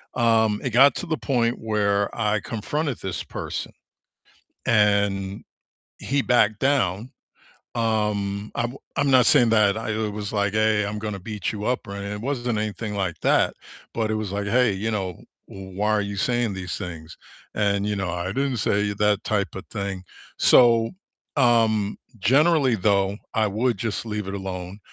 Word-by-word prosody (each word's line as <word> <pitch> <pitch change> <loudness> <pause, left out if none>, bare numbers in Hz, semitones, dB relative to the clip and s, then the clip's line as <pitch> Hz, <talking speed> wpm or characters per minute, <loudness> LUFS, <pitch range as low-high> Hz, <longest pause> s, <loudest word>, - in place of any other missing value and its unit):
um, 110 -3 +3
it 130 - -2
got 130 +3 +6
to 185 - -4
the 160 -2 -2
point 120 -3 0
where 100 -2 0
I 105 -1 +1
confronted 130 +7 -3
this 95 -2 -4
person, - - -5 0.9
and 100 -3 +2 0.6
he 140 0 0
backed 110 -3 +2
down. 125 -5 +1 0.6
Um, 105 -3 -1
I'm 120 +2 -2 0.2
I'm 145 -1 +2
not 130 -3 +6
saying 125 -6 +5
that 105 -1 +4
I, 110 -1 -3
uh, 110 -1 -1
was 105 0 -5
like, 100 -1 +1
"Hey, 110 -1 +2
I'm 105 +1 -4
gonna 105 -2 -4
beat 105 -1 -3
you 105 0 -5
up," 125 -4 -1
or 100 - -6
anything, 100 +1 -5
it - - -6
wasn't 120 -4 -1
anything 105 0 -4
like 90 -5 -2
that, - - +3 0.4
but 110 -1 -1
it - - 0
was 110 -3 -3
like, 100 0 -2
"Hey, 120 0 +3
you 110 +4 -2
know, 95 -4 -2 0.3
w 95 -1 -10
why 105 +1 +1
are 105 -1 +2
you 100 0 -4
saying 120 -2 0
these 95 -1 -5
things?" 85 -4 -8 0.4
And, 100 -1 +1
you 105 - -1
know, 95 -2 -2
"I 90 +1 -3
didn't 135 -3 -1
say," 105 0 +1
that 105 -1 +1
typa 100 -5 -2
thing. 100 -2 -4 0.3
So, 115 -2 +5 0.5
um, 110 -5 +3 0.2
generally 140 - +4
though, 100 0 +1 0.2
I 110 -2 +2
would 110 +2 0
just 115 +2 -3
leave 105 -3 -4
it 95 - -4
alone, 95 0 -6
105 Hz, 170 wpm, -24 LUFS, 100-115 Hz, 0.9 s, got